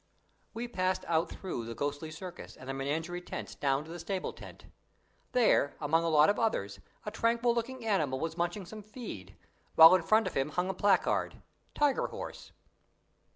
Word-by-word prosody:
We 235 +2 -3
passed 185 -5 -1
out 165 0 +1
through 175 -12 -5
the 115 0 -6
ghostly 145 +4 -3
circus 175 +3 -9
and 130 - -12
the 135 - -3
menagerie 160 +6 -3
tent - - -7
down 140 0 +1
to 160 - -11
the 175 - -7
stable 185 +2 -3
tent. - - -12 0.7
There, 230 - +3
among 160 +2 +2
a 165 - +1
lot 150 -1 +6
of 205 - +2
others, 100 - -1 0.3
a 210 - -3
tranquil 235 +2 +2
looking 240 +1 -4
animal 155 -12 +1
was 160 +1 -3
munching 175 +3 -2
some 215 +4 -9
feed, 205 - -9 0.4
while 160 +2 +10
in 185 - +4
front 215 +6 +3
of - - -3
him 135 +2 0
hung 180 +4 -1
a - - 0
placard, 200 -1 +1 0.3
"Tiger 290 -2 +2
Horse". - - -8
175 Hz, 180 wpm, -31 LUFS, 150-210 Hz, 0.7 s, while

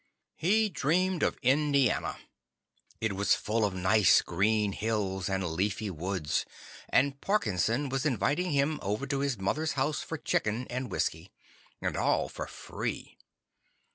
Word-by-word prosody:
He 215 +7 +3
dreamed 180 +1 +1
of - - +1
Indiana. 140 -1 +2 0.8
It 110 -3 -1
was 100 +1 +3
full 110 +1 -1
of 100 -3 0
nice, 95 -1 +5
green 105 +3 +1
hills 100 -3 -2
and 95 0 0
leafy 100 +5 -1
woods, 85 -2 -1 0.5
and 140 +1 +2
Parkinson 125 - +1
was 135 0 -1
inviting 150 +5 +1
him 145 +1 +1
over 105 +7 -2
to 140 0 -1
his 140 -3 0
mother's 155 +12 -1
house 145 +3 0
for 160 - -5
chicken 115 -3 -1
and 125 +1 -3
whiskey. 80 +4 -2 0.5
And - - -1
all - - +1
for - - -6
free. - - -5
115 Hz, 140 wpm, -30 LUFS, 100-145 Hz, 0.8 s, nice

